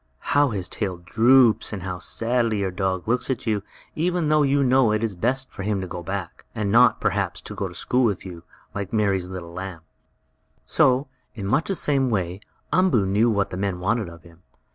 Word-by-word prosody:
How 145 -1 +4
his 95 -5 -3
tail 95 -4 -3
droops, 115 +6 +4
and 100 -4 -5
how 90 -1 -4
sadly 115 0 0
your 95 -1 -1
dog 95 0 -2
looks 125 +4 0
at 130 -1 -2
you, 105 -3 0 0.3
even 175 -1 0
though 155 0 +4
you 140 0 +3
know 130 -3 +4
it 110 +1 0
is 110 -3 -1
best 130 +8 -1
for 100 - -8
him 100 0 -1
to 95 - -4
go 85 0 -6
back, 95 0 -5
and 105 -3 -1
not, 120 +3 +5
perhaps, - - -1
go - - -4
to - - -11
school 125 +1 +1
with 100 -5 -1
you, 90 -3 -8 0.3
like 100 -1 -4
Mary's 100 -4 +1
little 90 -3 -7
lamb. 90 -2 -6 0.8
So, 130 +2 +3 0.3
in 100 -4 -5
much 135 +11 +1
the 195 - 0
same 135 -5 +1
way, 95 -3 -2 0.3
Umboo 180 - +3
knew 105 +5 +2
what 100 -3 0
the 90 - -4
men 95 -2 -2
wanted 100 +1 0
of 85 -1 -14
him. 85 0 -18
105 Hz, 205 wpm, -23 LUFS, 95-125 Hz, 0.8 s, not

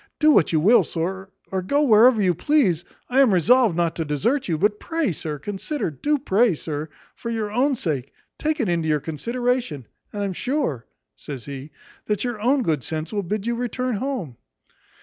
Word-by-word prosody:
Do 310 0 +5
what 185 - +4
you 160 - +3
will, 215 +10 +5
sir, 190 +3 -4 0.2
or 190 -1 -1
go 285 +11 +1
wherever 230 -1 +6
you 185 -3 +3
please, 190 - +2 0.2
I 255 +2 +1
am 260 -5 +5
resolved 220 +3 +4
not 170 -1 +1
to 165 - 0
desert 205 - 0
you. 165 -3 0
But 210 +5 +1
pray, 325 - -1
sir, 155 -1 -5
consider 205 - -3
do 290 - 0
pray, 235 - +2
sir, 155 0 -5 0.2
for 235 - -7
your 220 -2 -2
own 265 +5 +2
sake, 140 - -3 0.3
take 310 +1 -1
it 235 - +1
into 170 -2 0
your 150 -1 +2
consideration; 230 - -2 0.3
and 205 -1 -3
I'm 195 -2 -2
sure," 245 - -2 0.3
says 135 -5 -8
he, 140 +1 -7 0.4
"that 210 -2 0
your 240 -4 -3
own 260 +3 +2
good 155 - 0
sense 160 - -4
will 205 - 0
bid 205 +3 -3
you 235 - 0
return 245 0 -2
home." 205 - -4
205 Hz, 190 wpm, -23 LUFS, 160-250 Hz, 0.4 s, wherever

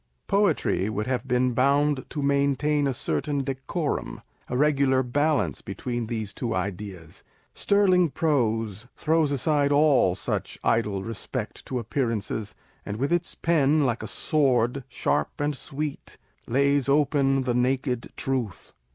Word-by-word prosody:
Poetry 175 - +1
would 105 0 -2
have 130 +1 -2
been 125 0 +2
bound 140 +2 +2
to 145 - -4
maintain 140 +1 +2
a - - +1
certain 135 - -1
decorum, 135 - -3 0.3
a 125 - -2
regular 140 -2 +3
balance 140 - 0
between 120 -2 -4
these 110 -4 -4
two 115 +1 -3
ideas; 95 -3 -5 0.3
sterling 185 -4 +3
prose 115 - 0
throws 160 -2 +2
aside 145 +1 +1
all 145 - +4
such 95 - -3
idle 105 -4 +1
respect 115 +1 -6
to 130 - -2
appearances, 115 -3 -2 0.3
and 105 +1 -5
with 140 +7 0
its 175 0 0
pen, 155 -3 +2
like 120 -2 0
a - - -5
sword, 135 -3 +1
" - - -42
sharp - - -1
and 145 0 0
sweet," 145 +2 -5 0.3
lays 140 +2 +2
open 140 -2 +2
the 125 -1 0
naked 125 0 0
truth 125 -9 -3
135 Hz, 135 wpm, -26 LUFS, 115-145 Hz, 0.3 s, all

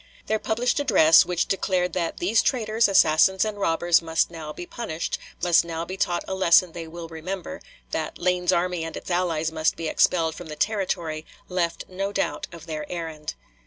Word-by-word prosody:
Their 220 0 0
published 235 +6 0
address, 165 - +6
which 175 -1 0
declared 180 -2 0
that 170 -2 -2
"these 205 +6 +2
traitors, 225 -2 +2
assassins, 190 +1 +4
and 210 -1 -4
robbers 170 -2 +3
must 165 0 0
now 160 -3 -7
be 175 - -7
punished, 170 -6 -4 0.2
must 175 -2 +5
now 165 0 -4
be 185 - -6
taught 175 -2 -1
a - - -3
lesson 185 -1 +4
they 165 -1 -7
will 165 +1 -8
remember," 170 +3 -6 0.3
that 160 -1 -3
"Lane's 180 0 +1
army 180 -1 0
and 165 - -5
its - - -7
allies 165 -3 0
must 160 0 +1
be 165 - -4
expelled 160 0 +2
from 175 +1 -9
the 155 - -7
Territory," 170 -6 -1 0.3
left 175 -2 -1
no 195 +2 -3
doubt 195 -1 -2
of 170 -2 -11
their 155 -2 -6
errand. 160 -3 -5
175 Hz, 185 wpm, -24 LUFS, 160-190 Hz, 0.3 s, address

